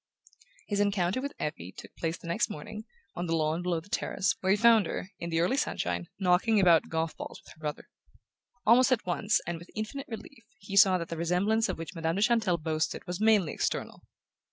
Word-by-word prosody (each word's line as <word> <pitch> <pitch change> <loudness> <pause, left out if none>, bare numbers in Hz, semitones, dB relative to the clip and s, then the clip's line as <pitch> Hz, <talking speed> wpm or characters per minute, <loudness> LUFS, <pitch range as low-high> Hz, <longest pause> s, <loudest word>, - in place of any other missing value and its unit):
His 205 -1 -1
encounter 200 +2 +1
with 280 +1 -4
Effie 95 - -4
took - - -12
place 165 0 -2
the - - -15
next 170 - 0
morning, 215 +8 -7 0.3
on 175 0 -4
the 165 - +1
lawn 160 +1 0
below 175 -2 0
the 165 - -16
terrace, 195 -1 0
where 190 - -1
he 200 - +5
found 230 -1 +5
her, 190 - -5
in 170 - -4
the 165 -1 0
early 185 +11 +1
sunshine, 85 - -1
knocking 195 +4 +3
about 175 -4 +5
golf 160 0 -2
balls - - -8
with - - -14
her - - -25
brother. 150 -1 -5 0.8
Almost 250 +4 +6
at 255 - +1
once, 205 +4 +1
and 175 -1 -4
with 170 - -14
infinite 220 +6 -5
relief, 230 +2 -9
he 195 -1 -7
saw 195 -2 +7
that 170 -1 -5
the 165 - -4
resemblance 195 +7 +1
of - - -2
which 165 +2 -7
Madame 165 -1 -1
de 200 - +1
Chantelle 220 -7 +2
boasted 155 0 -2
was 180 +3 -5
mainly 215 -7 +4
external. - - -3
180 Hz, 210 wpm, -29 LUFS, 165-215 Hz, 0.8 s, saw